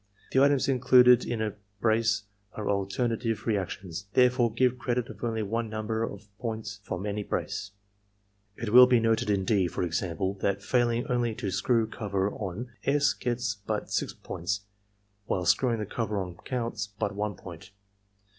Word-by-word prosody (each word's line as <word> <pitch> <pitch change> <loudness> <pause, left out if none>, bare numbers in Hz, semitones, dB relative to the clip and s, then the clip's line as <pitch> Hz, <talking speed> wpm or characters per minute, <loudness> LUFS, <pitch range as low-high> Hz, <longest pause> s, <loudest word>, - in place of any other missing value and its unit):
The 130 - +4
items 140 -1 +4
included 125 -2 +6
in 115 -2 -2
a 105 -2 -2 0.3
brace 110 -1 +2 0.3
are 105 - -5
alternative 110 +3 -1
reactions, 95 -3 -3
therefore 125 -2 +4
give 125 +2 +1
credit 125 -1 -1
of 110 0 -10
only 115 -2 -1
one 115 +2 -2
number 110 +1 -2
of 105 -2 -5
points 110 -4 -4
from 95 -1 -5
any 105 0 -2
brace. 95 -1 -3 0.9
It 115 0 -4
will 125 0 +10
be 125 -1 +4
noted 115 -1 +1
in 100 -2 +1
D, 100 -4 +2
for 85 - -3
example, 90 +2 -1
that, 100 -1 0
failing 120 -1 +1
only 120 -2 0
to 105 -5 -3
screw 115 +3 +2
cover 100 -3 -2
on, 105 +5 -5
S. 140 0 +3
gets 120 -2 -2
but 105 -1 -4
6 - - -1
points, 95 +3 -3 0.7
while 90 -1 -1
screwing 120 +6 +3
the 105 - -3
cover 110 0 -2
on 90 -2 -4
coimts 115 +1 -4
but 105 - -1
1 105 0 -2
point. 90 0 -11
110 Hz, 165 wpm, -28 LUFS, 100-120 Hz, 0.9 s, will